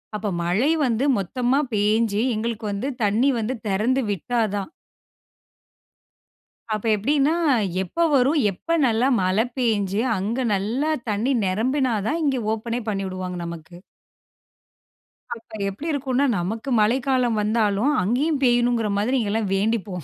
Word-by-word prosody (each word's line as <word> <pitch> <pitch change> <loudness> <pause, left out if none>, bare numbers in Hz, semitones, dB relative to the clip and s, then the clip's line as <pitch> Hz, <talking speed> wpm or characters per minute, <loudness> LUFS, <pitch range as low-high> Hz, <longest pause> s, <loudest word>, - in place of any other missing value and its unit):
அப்ப 210 0 -3 0.2
மழை 215 - +2
வந்து 245 +3 0
மொத்தமா 245 +8 0
பேஞ்சு 210 +1 +1
எங்களுக்கு 225 0 -3
வந்து 205 +8 -3
தண்ணி 220 +7 +3
வந்து 225 +4 -2
தெறந்து 225 +7 +1
விட்டா 230 +5 -1
தான். 200 - -4 2.0
அப்ப 215 +1 -3
எப்டின்னா, 280 +8 +1 0.5
எப்ப 335 - 0
வரும், 275 +4 +3
எப்ப 330 - -2
நல்ல 240 +3 +2
மழை 190 +6 +2
பேய்ஞ்சு 210 -5 0 0.2
அங்க 230 +7 -2
நல்லா 235 +11 -1 0.2
தண்ணீ 220 +6 0
நெரம்பினா 245 +6 0
தான் 325 +2 -1
இங்கே 270 -3 +1
ஓப்பனே 230 +2 -3
பண்ணிவிடுவாங்க 185 -3 -4
நமக்கு. 170 0 -9 1.6
அப்ப 225 -2 -10
எப்டி 205 +11 -8
இருக்கும்னா 275 -1 0
நமக்கு 220 +9 -4
மழைக்காலம் 245 +1 +1
வந்தாலும், 215 +4 +1
அங்கேயும் 270 - 0
பெய்யணுங்கிற 240 -2 +2
மாதிரி 230 +6 +1
இங்கெல்லாம் 215 -2 -1
வேண்டிப்போம். 200 -4 -1
225 Hz, 120 wpm, -23 LUFS, 200-260 Hz, 2.0 s, தண்ணி